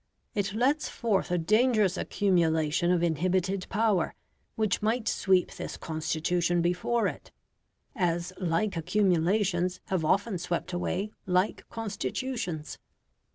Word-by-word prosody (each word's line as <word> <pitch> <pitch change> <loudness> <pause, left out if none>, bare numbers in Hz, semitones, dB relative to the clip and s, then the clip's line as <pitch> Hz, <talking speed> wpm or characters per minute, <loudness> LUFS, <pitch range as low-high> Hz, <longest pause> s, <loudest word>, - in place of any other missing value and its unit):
It 200 -1 -1
lets 275 +7 +1
forth 210 -5 0
a 180 - +1
dangerous 215 +2 +3
accumulation 170 -4 +1
of 175 -1 +2
inhibited 185 +3 0
power, 210 -4 +1 0.4
which 215 -3 0
might 220 +2 0
sweep 190 -2 +2
this - - -6
Constitution 165 +2 0
before 180 +7 +1
it, - - -4 0.7
as 175 -3 0
like 185 +3 0
accumulations 180 +1 +1
have 185 -4 0
often 195 +4 +1
swept 175 +1 -3
away 185 +3 -2 0.2
like 185 +3 0
Constitutions. 205 - -4
185 Hz, 110 wpm, -28 LUFS, 170-210 Hz, 0.7 s, dangerous